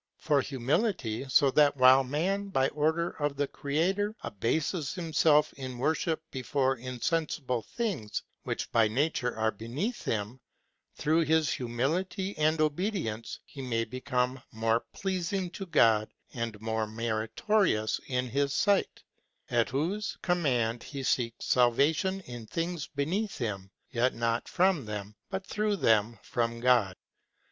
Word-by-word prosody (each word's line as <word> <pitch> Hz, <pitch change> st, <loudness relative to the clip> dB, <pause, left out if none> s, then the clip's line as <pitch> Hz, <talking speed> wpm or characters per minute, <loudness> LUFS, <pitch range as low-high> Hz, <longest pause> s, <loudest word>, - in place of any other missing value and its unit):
For 145 Hz, -3 st, +2 dB
humility, 135 Hz, -, -1 dB
so 135 Hz, +1 st, +5 dB
that 145 Hz, +1 st, +4 dB
while 130 Hz, +1 st, +7 dB
man, 180 Hz, +10 st, -1 dB
by 135 Hz, -9 st, +1 dB
order 160 Hz, +3 st, 0 dB
of 145 Hz, -1 st, 0 dB
the 145 Hz, 0 st, 0 dB
Creator, 190 Hz, +11 st, -1 dB
abases 145 Hz, -, -1 dB
himself 160 Hz, -3 st, +3 dB
in 130 Hz, -2 st, -6 dB
worship 160 Hz, +4 st, 0 dB
before 130 Hz, +1 st, 0 dB
insensible 130 Hz, 0 st, -1 dB
things, 160 Hz, -, -3 dB, 0.2 s
which -, -, -4 dB
by 115 Hz, -2 st, +4 dB
nature 125 Hz, 0 st, 0 dB
are 110 Hz, 0 st, +2 dB
beneath 130 Hz, -, -4 dB
him, 110 Hz, +4 st, -2 dB, 0.6 s
through 160 Hz, +2 st, +2 dB
this 160 Hz, 0 st, +3 dB
humility 165 Hz, -, -1 dB
and 155 Hz, +1 st, +3 dB
obedience, 155 Hz, -, -1 dB
he 140 Hz, -, -9 dB
may 115 Hz, -3 st, -1 dB
become 130 Hz, +1 st, -1 dB
more 115 Hz, +1 st, +1 dB
pleasing 185 Hz, -1 st, -2 dB
to 195 Hz, +1 st, -7 dB
God, 110 Hz, -9 st, +4 dB, 0.2 s
and 115 Hz, -3 st, -4 dB
more 110 Hz, 0 st, -1 dB
meri 110 Hz, 0 st, -2 dB
torious 190 Hz, -, +2 dB
in 125 Hz, -1 st, -1 dB
his 140 Hz, +3 st, 0 dB
sight, 200 Hz, -1 st, +1 dB, 0.5 s
at 120 Hz, -1 st, +2 dB
whose 175 Hz, +11 st, -2 dB
command 125 Hz, -10 st, +1 dB
he 140 Hz, -2 st, -6 dB
seeks 120 Hz, -2 st, 0 dB
salvation 150 Hz, -, +3 dB
in 120 Hz, -8 st, -9 dB
things 165 Hz, +1 st, -3 dB
beneath 180 Hz, +9 st, -2 dB
him, 100 Hz, -5 st, -3 dB, 0.2 s
yet 125 Hz, +2 st, +1 dB
not 115 Hz, 0 st, -1 dB
from 180 Hz, -7 st, +2 dB
them, 105 Hz, -1 st, -5 dB, 0.2 s
but 190 Hz, -1 st, -4 dB
through 210 Hz, +1 st, 0 dB
them 115 Hz, -, +2 dB
from 115 Hz, -1 st, -1 dB
God. 120 Hz, -6 st, +3 dB
135 Hz, 135 wpm, -29 LUFS, 115-165 Hz, 0.6 s, while